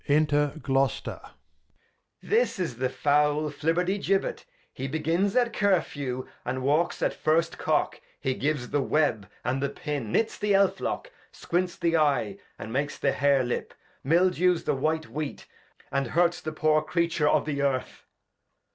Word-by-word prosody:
Enter 145 -1 +3
Gloster. 135 -2 -1
Edg. - - -13 0.9
This 455 - +1
is 165 -11 -3
the 130 0 0
foul 150 +3 +2
Flibertigibet; 180 +6 0 0.3
he 135 - -4
begins 165 +7 0
at 240 -2 +2
Cur 200 -4 +3
few, 130 -4 -5 0.2
and 130 0 -3
walks 150 +5 +1
at - - +1
first 165 +2 +1
Cock, - - 0 0.2
he 130 - 0
gives 135 -2 -2
the 145 - +2
Web, 130 -8 +1 0.2
and 130 +1 0
the 140 - 0
Pin; 140 -7 -4
knits 225 - 0
the 205 -1 +1
Elfiock; 200 - 0 0.2
squints 180 +1 -2
the 170 -1 +2
Eye, 130 -10 +1 0.2
and 110 +2 -7
makes 145 +2 -1
the - - +1
Hair 140 -2 +3
Lip; 120 - -3 0.3
mildews 180 +3 +3
the - - +1
white 155 +3 -1
Wheat, 145 +5 -5 0.5
and 140 -2 0
hurts 175 +5 +2
the 155 - -4
poor 155 0 +2
Creature 170 -1 +1
of - - +2
the 145 -2 -2
Earth. 135 -2 -2
150 Hz, 155 wpm, -27 LUFS, 135-170 Hz, 0.9 s, Enter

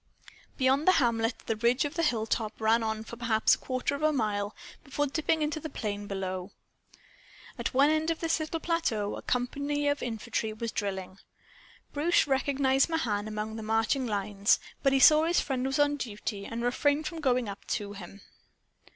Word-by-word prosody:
Beyond 270 +3 +2
the 370 - +7
hamlet 230 -4 +1
the 225 - -1
ridge 240 +5 +2
of 290 - -4
hilltop 225 -8 -1
ran 225 +1 +3
on 220 -1 -2
for 235 +1 -9
perhaps 225 -2 +3
a - - +2
quarter 260 +2 -2
mile 210 -6 -1 0.3
before 290 +1 -1
dipping 315 +2 0
into 300 +1 -1
the 315 - -6
plain 205 -6 -4
below. 190 -1 -4 1.1
At - - -3
one 280 +3 +5
end 315 +1 +1
of 330 - -1
this 330 -1 0
little 315 +1 -3
plateau 270 -12 -1
a - - -7
company 285 +4 -1
of 285 0 +1
infantry 225 -1 -3
was 225 +1 -4
drilling. 190 -2 -4 0.7
Bruce 320 +4 +3
recognized 270 0 +2
Mahan 220 -11 -1
among 215 +1 -4
the - - -5
marching 225 +4 +1
lines, 205 -1 +1 0.2
but 275 - +3
he 270 - +3
saw 305 +3 +7
his 345 +1 +3
friend 265 -2 -1
was 270 +2 -1
on 290 0 +3
duty 210 -4 -5
and 230 +1 -4
refrained 285 +5 +1
from 330 -1 -5
going 250 -4 +1
up 200 -1 -7
to 205 -1 -3
him. 195 0 -10
245 Hz, 175 wpm, -29 LUFS, 215-290 Hz, 1.1 s, the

